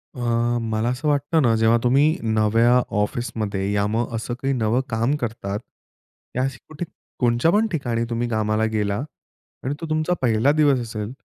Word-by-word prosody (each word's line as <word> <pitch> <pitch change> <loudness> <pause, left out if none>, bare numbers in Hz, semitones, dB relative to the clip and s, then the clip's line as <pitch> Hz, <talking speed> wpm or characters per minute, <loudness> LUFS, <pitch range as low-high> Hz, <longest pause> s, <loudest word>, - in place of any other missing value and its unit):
अ, - - -8 0.4
मला 110 +1 -1
असं 130 +5 -2
वाटतं 145 +3 +2
ना, 115 -5 +3
जेव्हा 110 +1 +4
तुम्ही 140 +6 +3
नव्या 115 +3 +3 0.2
ऑफिसमध्ये, 105 -3 -2
या 100 0 +1
मग 115 +2 -1
असं 115 +2 -3
काही 135 0 0
नवं 120 0 +1
काम 115 +5 +1
करतात. 110 -6 -4 0.8
या 125 - +1
अशी 135 -1 -2
कुठे 155 +2 -5 0.3
कोणच्या 120 +5 +3
पण 215 +3 +3
ठिकाणी 120 -8 -1
तुम्ही 120 0 -1
कामाला 110 -1 +1
गेला 100 -2 0 0.7
आणि 130 - -1
तो - - -3
तुमचा 155 +3 +1
पहिला 120 +2 +3
दिवस 145 -3 +3
असेल, 110 -2 -5
120 Hz, 165 wpm, -23 LUFS, 110-135 Hz, 0.8 s, जेव्हा